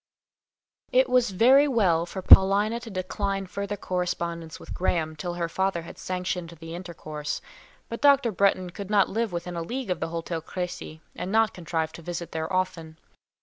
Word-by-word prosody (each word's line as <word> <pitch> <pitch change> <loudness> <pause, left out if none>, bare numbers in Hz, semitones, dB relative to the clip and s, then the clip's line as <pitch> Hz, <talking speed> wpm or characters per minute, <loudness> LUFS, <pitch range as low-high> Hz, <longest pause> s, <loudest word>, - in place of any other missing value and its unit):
It 260 +1 +4
was 250 -2 +3
very 255 +9 +5
well 180 - +2
for 190 +1 -6
Paulina 205 +5 +6
to 235 -1 -9
decline 195 0 -2
further 200 +2 -4
correspondence 170 -3 -3
with - - -8
Graham 160 -3 -1
till 175 +3 -4
her 170 -1 -1
father 190 0 -1
had 170 - -11
sanctioned 180 -1 -3
the 165 0 -8
intercourse. 155 -4 -5 0.5
But 230 - -6
Dr. 280 -4 +5
Bretton 185 -2 +2
could 200 +2 -7
not 205 -2 +4
live 225 0 -1
within 175 0 -4
a 170 - -2
league 240 +5 -4
of 180 - -1
the - - -2
Hôtel 165 0 -4
Crécy, 175 -2 -6
and 180 - -4
not 220 0 +3
contrive 160 -2 -2
to 160 - -11
visit 170 0 -5
there 160 +2 -3
often. 165 -4 -2
180 Hz, 175 wpm, -26 LUFS, 170-200 Hz, 0.5 s, Paulina